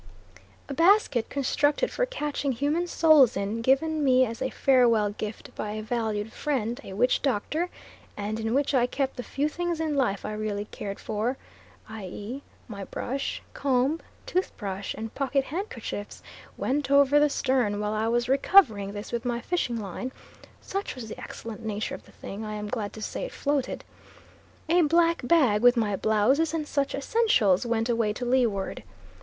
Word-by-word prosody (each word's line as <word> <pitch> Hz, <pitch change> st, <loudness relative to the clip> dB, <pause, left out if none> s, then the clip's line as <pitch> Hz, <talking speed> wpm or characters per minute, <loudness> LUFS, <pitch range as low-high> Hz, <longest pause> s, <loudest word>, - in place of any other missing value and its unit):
A 280 Hz, -, -4 dB
basket 330 Hz, -, +3 dB
constructed 290 Hz, -, +1 dB
for -, -, 0 dB
catching 295 Hz, -, -2 dB
human 295 Hz, +8 st, 0 dB
souls 310 Hz, -, +5 dB
in, 205 Hz, +3 st, -2 dB
given 300 Hz, +5 st, +2 dB
me 255 Hz, -1 st, +5 dB
as 230 Hz, -1 st, -6 dB
a 260 Hz, -, 0 dB
farewell 235 Hz, -7 st, +3 dB
gift 215 Hz, +1 st, -7 dB
by 210 Hz, 0 st, -4 dB
a 215 Hz, 0 st, -4 dB
valued 220 Hz, -2 st, -2 dB
friend, 245 Hz, -5 st, -2 dB
a 190 Hz, -, -8 dB
witch 245 Hz, +6 st, +2 dB
doctor, 290 Hz, +7 st, 0 dB, 0.5 s
and 210 Hz, +2 st, -3 dB
in 225 Hz, +2 st, -1 dB
which 285 Hz, +1 st, +1 dB
I 245 Hz, -2 st, +3 dB
kept 270 Hz, +1 st, -2 dB
the 250 Hz, -, -4 dB
few 280 Hz, +4 st, -1 dB
things 345 Hz, +1 st, -2 dB
in 315 Hz, -2 st, -1 dB
life 235 Hz, -8 st, 0 dB
I -, -, -3 dB
really 210 Hz, -1 st, -3 dB
cared 200 Hz, -1 st, -6 dB
for, 220 Hz, +5 st, -2 dB, 0.5 s
i.e. 215 Hz, +4 st, -7 dB, 0.3 s
my 200 Hz, -4 st, -7 dB
brush, 270 Hz, +7 st, -4 dB
comb, 275 Hz, +3 st, +1 dB, 0.3 s
tooth 370 Hz, +1 st, -1 dB
brush, 200 Hz, -1 st, -4 dB
and 225 Hz, +1 st, -6 dB
pocket 275 Hz, 0 st, 0 dB
handkerchiefs, 265 Hz, -, -5 dB, 0.3 s
went 280 Hz, +2 st, -1 dB
over 280 Hz, +1 st, +5 dB
the 295 Hz, 0 st, +4 dB
stern; 245 Hz, -7 st, +1 dB
while 210 Hz, 0 st, -1 dB
I 215 Hz, +1 st, 0 dB
was 235 Hz, +1 st, +1 dB
recovering 255 Hz, -, +4 dB
this 205 Hz, +1 st, -7 dB
with 235 Hz, 0 st, -2 dB
my 240 Hz, -1 st, -1 dB
fishing 245 Hz, -4 st, -1 dB
line 210 Hz, +5 st, -5 dB, 0.5 s
(such 395 Hz, +1 st, -4 dB
was 235 Hz, -4 st, -7 dB
the -, -, -8 dB
excellent 230 Hz, 0 st, -8 dB
nature 215 Hz, -1 st, -3 dB
of -, -, -8 dB
the -, -, -17 dB
thing, 200 Hz, +3 st, -8 dB
I 215 Hz, 0 st, -4 dB
am 210 Hz, 0 st, -5 dB
glad 210 Hz, -4 st, -3 dB
to 220 Hz, -, -7 dB
say -, -, -3 dB
it -, -, -7 dB
floated) 285 Hz, -2 st, -1 dB, 0.8 s
a 345 Hz, +2 st, +4 dB
black 335 Hz, +2 st, +3 dB
bag 245 Hz, -8 st, +4 dB
with 245 Hz, +1 st, +6 dB
my 210 Hz, -3 st, +1 dB
blouses 245 Hz, -, +2 dB
and 305 Hz, -2 st, -2 dB
such 280 Hz, -2 st, 0 dB
essentials 275 Hz, -, +2 dB
went 230 Hz, -1 st, 0 dB
away 230 Hz, -3 st, +1 dB
to 245 Hz, -, -5 dB
leeward. 240 Hz, -6 st, +1 dB
245 Hz, 175 wpm, -27 LUFS, 215-290 Hz, 0.8 s, with